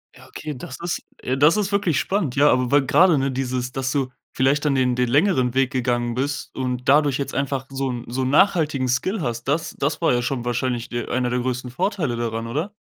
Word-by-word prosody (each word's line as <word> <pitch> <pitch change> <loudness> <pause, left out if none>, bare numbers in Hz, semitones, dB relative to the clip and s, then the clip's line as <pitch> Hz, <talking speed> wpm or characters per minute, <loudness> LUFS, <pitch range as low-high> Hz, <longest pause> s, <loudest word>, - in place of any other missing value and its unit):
Ja, - - -16
okay, 150 -1 -6
das 130 +1 -8
ist 175 - -2 0.4
das 155 +8 +5
ist 205 -1 -1
wirklich 195 -6 +1
spannend, 190 -10 -1
ja, 145 +1 +5
aber 125 -1 +1
weil 145 0 +3
grade, 170 +3 +5
ne, 135 0 0
dieses, 125 -1 -2
dass 130 0 -2
du 135 -3 0 0.2
vielleicht 135 +3 +2
dann 145 -3 +2
den 125 -2 +2
den 125 0 +1
längeren 135 -4 +2
Weg 135 -1 +2
gegangen 120 -2 0
bist 140 +4 -3
und 125 -1 -3
dadurch 145 -1 +4
jetzt 140 - -4
einfach 135 -1 -2
so 135 -1 -2
'n 120 -1 -4
so 125 +3 -3
'n 130 - 0
nachhaltigen 150 -5 +3
Skill 185 - 0
hast, 120 -2 -3
das 150 +4 -1
das 145 +3 -1
war 165 - +3
ja 120 - +1
schon 120 -1 -3
wahrscheinlich 120 0 -1
de 120 -1 -4
einer 125 -1 0
der 125 - 0
größten 125 0 -3
Vorteile 175 - -1
daran, 115 -1 -3
oder? 155 - -3
130 Hz, 225 wpm, -22 LUFS, 125-150 Hz, 0.4 s, das